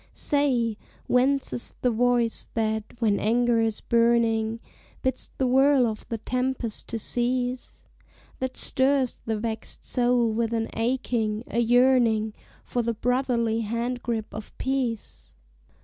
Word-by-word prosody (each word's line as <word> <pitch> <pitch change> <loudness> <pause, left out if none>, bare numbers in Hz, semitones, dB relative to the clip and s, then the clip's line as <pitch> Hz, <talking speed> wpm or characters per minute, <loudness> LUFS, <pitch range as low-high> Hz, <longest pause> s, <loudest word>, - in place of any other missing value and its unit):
Say, 250 -7 +2 0.3
whence 265 +2 +2
is 240 - -1
the 250 - +3
voice 240 0 +1
that, 220 -1 0
when 220 -4 +1
anger 235 +1 +2
is 225 -1 -1
burning, 230 -1 +2 0.4
Bids 260 -1 -1
the 265 - +1
whirl 265 +1 +4
of 220 -2 -4
the 230 - -2
tempest 250 -1 -2
to 230 - -3
cease? 245 +2 -2 0.6
That 260 0 -3
stirs 265 -1 +1
the 220 -1 -2
vexed 220 0 -5
soul 245 -2 +2
with 230 +1 -1
an 225 -1 -1
aching 230 -2 -1
a 235 - -2
yearning 235 -3 +3 0.3
For 245 - -2
the 230 0 -2
brotherly 240 -1 0
hand 235 +3 -2
grip 225 -3 -3
of 215 0 -9
peace? 255 -4 -3
235 Hz, 135 wpm, -25 LUFS, 225-250 Hz, 0.6 s, whirl